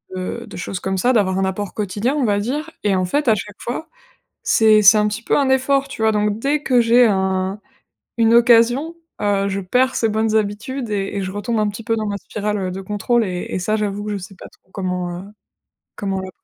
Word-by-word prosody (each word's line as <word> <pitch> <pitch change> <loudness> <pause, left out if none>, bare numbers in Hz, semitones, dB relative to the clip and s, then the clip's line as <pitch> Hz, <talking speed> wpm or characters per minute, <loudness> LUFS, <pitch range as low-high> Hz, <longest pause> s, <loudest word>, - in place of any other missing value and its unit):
de 185 0 -5
de - - -10
choses 180 +1 -4
comme 190 +1 -2
ça, 250 +6 +2
d'avoir 190 -5 +2
un 195 - +1
apport 190 +1 -3
quotidien 210 +5 -1
on 285 -4 +1
va 205 -2 +2
dire, 290 +9 -3
et 205 -2 +2
en 185 -1 +1
fait, 290 +10 -1
à 225 - +6
chaque 210 0 -6
fois, 260 +6 -5 0.5
c'est 215 -1 +4
c'est 210 +2 +7
un 210 - +2
petit 210 +2 -3
peu - - +1
un 280 -2 +2
effort, 270 +1 +2
tu 275 -5 -7
vois? 220 - +4
Donc 210 0 0
dès 285 +4 +1
que 250 -2 +3
j'ai 235 +1 +5
un 190 -1 0 0.6
une 230 0 +4
occasion, 240 +7 +4 0.2
heu, 200 -1 +1
je 195 0 -2
perds 250 +8 +1
ces 225 - +1
bonnes 220 +1 0
habitudes 220 +4 -2
et 200 -2 -2
et 200 - -1
je 185 - -4
retombe 205 +3 -2
un 210 -1 +1
petit 210 +2 -8
peu 225 0 +1
dans 220 -1 -2
ma 205 -1 -2
spirale, 210 +1 -3
heu, 185 -2 -3
de 190 +1 -6
contrôle 210 +4 0
et 180 -3 -4
et - - -2
ça 215 +4 0
j'avoue 205 -1 -2
que 210 - -4
je 205 - -2
sais 195 +1 -10
pas - - -11
trop - - -29
comment, 180 -2 -3
heu, 180 - -8 0.7
comment 195 -1 -3
la. 190 - -7
210 Hz, 240 wpm, -20 LUFS, 195-235 Hz, 0.7 s, c'est